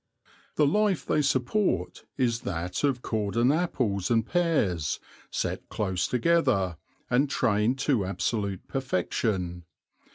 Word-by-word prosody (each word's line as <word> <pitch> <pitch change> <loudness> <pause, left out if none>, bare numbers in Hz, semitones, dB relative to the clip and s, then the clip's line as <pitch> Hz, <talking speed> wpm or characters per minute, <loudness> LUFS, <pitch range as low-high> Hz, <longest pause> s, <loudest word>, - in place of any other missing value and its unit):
The 150 - +4
life 200 +4 +2
they 150 - +2
support 140 - 0
is 120 -4 +1
that 90 - -3
of 135 -4 +1
cordon 110 +3 +1
apples 125 - 0
and 115 -2 +2
pears, 120 - +1 0.3
set - - -3
close 95 -4 -1
together, 125 - +2 0.3
and 135 +4 +2
trained 110 +3 +2
to 130 -8 +2
absolute 100 0 -2
perfection. 90 -7 -1
115 Hz, 110 wpm, -27 LUFS, 100-140 Hz, 0.3 s, The